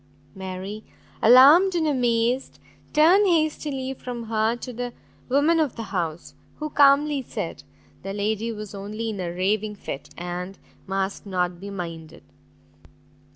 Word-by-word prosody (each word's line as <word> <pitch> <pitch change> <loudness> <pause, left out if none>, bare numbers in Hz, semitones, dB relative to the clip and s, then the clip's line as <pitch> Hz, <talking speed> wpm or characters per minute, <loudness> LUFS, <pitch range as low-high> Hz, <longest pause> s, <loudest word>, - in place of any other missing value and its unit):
Mary, 190 +2 -6 0.4
alarmed 290 - +7
and 330 -2 +1
amazed, 245 -2 0 0.3
turned 350 +7 +5
hastily 300 -5 0
from 245 -2 -6
her 220 0 0
to 250 +1 -8
the 245 +1 -5 0.4
woman 295 +5 +3
of 300 -6 0
the 230 - -5
house, 170 -3 -3 0.2
who 305 0 -5
calmly 285 0 +4
said, 210 -8 -5 0.4
the 195 - -5
lady 215 +3 -1
was 210 -2 -7
only 210 +3 -4
in 205 - -6
a 180 -2 -2
raving 205 +4 -1
fit, 145 -7 -7
and 180 +2 -5 0.3
must 195 +1 -3
not 180 -2 -1
be 200 +2 -7
minded. 165 -4 -7
220 Hz, 135 wpm, -24 LUFS, 195-270 Hz, 0.4 s, alarmed